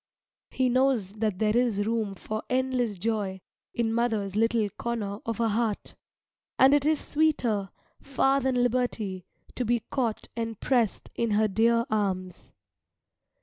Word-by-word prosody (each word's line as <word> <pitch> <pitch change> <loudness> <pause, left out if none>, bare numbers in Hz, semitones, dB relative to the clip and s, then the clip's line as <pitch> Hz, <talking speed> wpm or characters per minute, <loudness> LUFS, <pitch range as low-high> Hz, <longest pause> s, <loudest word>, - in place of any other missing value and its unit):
He 260 - +1
knows 250 -6 +2
that 215 -4 0
there 215 +1 +1
is 230 -5 +2
room 220 -3 -1
for 215 +4 -4
endless 255 -4 0
joy 200 -1 -2 0.3
in 225 -1 -1
mother's 220 -4 0
little 225 0 +2
corner 215 -4 -4
of 230 0 -2
a 230 -1 +2
heart, 220 -1 -1 0.6
and 265 +2 +6
it 290 0 +3
is 310 -1 +2
sweeter 245 -10 0 0.3
far 270 0 +2
than 260 0 0
liberty 225 -7 -1 0.3
to 250 - -2
be 240 0 +1
caught 235 -5 -1
and 225 -2 -4
pressed 240 -6 0
in 235 - -1
her 215 0 +3
dear 230 +3 +2
arms. 185 -4 -2
230 Hz, 145 wpm, -27 LUFS, 210-250 Hz, 0.6 s, and